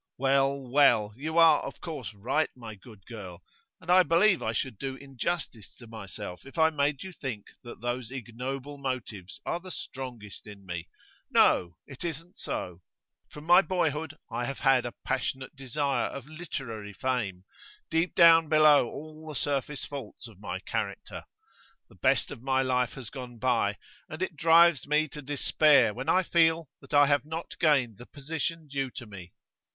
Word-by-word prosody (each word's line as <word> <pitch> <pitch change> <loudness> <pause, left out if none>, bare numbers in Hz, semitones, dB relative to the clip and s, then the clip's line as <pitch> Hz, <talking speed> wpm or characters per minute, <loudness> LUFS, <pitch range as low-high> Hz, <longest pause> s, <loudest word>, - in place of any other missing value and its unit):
'Well, 135 +1 +2
well; 130 -5 +3
you 155 +6 -4
are 165 -1 +7
of - - -7
course 150 -10 -6
right, 130 +10 0
my 115 -3 -9
good 105 0 -16
girl. 95 -7 -9 0.4
And 170 - -3
I 185 +1 +8
believe 180 +2 +4
I 110 - -1
should 115 -1 -3
do 135 -1 -4
injustice 135 - -4
to 120 - -13
myself 100 -5 -8
if 135 +4 -13
I 160 0 +5
made 145 -2 0
you 190 - -7
think 130 - -6 0.2
that 120 - -11
those 120 -1 -3
ignoble 130 +3 -6
motives 120 -8 -5
are 170 - -1
the 185 +1 -11
strongest 125 - -8
in 100 -2 -12
me. 90 -2 -5 0.4
No; 85 -1 +3
it 135 +1 -10
isn't 165 +1 -6
so. 90 -1 -5 0.5
From 150 - -11
my 175 +4 +7
boyhood 160 -5 -1
I 120 - -2
have 135 - -5
had 135 -3 +4
a 120 - -7
passionate 130 +2 -2
desire 135 +1 -1
of 135 -2 -7
literary 135 -10 -6
fame, 105 -6 -2 0.5
deep 165 +2 +1
down 165 -2 +7
below 155 -4 +6
all 155 +1 -10
the 150 - -6
surface 140 +1 -2
faults 140 -3 -8
of 105 -4 -16
my 90 -3 -4
character. 100 -1 -4 0.6
The - - -18
best - - +2
of - - -8
my 135 0 +1
life 125 -1 +1
has 125 -5 -9
gone 125 -2 -8
by, 115 -5 +1 0.3
and 155 +4 -4
it 185 - -4
drives 165 -1 +5
me 150 +2 +2
to 150 - -8
despair 145 -3 +4
when 130 +4 -4
I 185 - +4
feel 165 -3 +2
that 135 - -16
I 145 0 +7
have 145 -2 +2
not 160 +2 -5
gained 135 - +2
the 120 - -11
position 155 +2 -4
due 135 -1 -2
to 120 - -6
me. 95 -5 -11
135 Hz, 175 wpm, -28 LUFS, 115-155 Hz, 0.6 s, I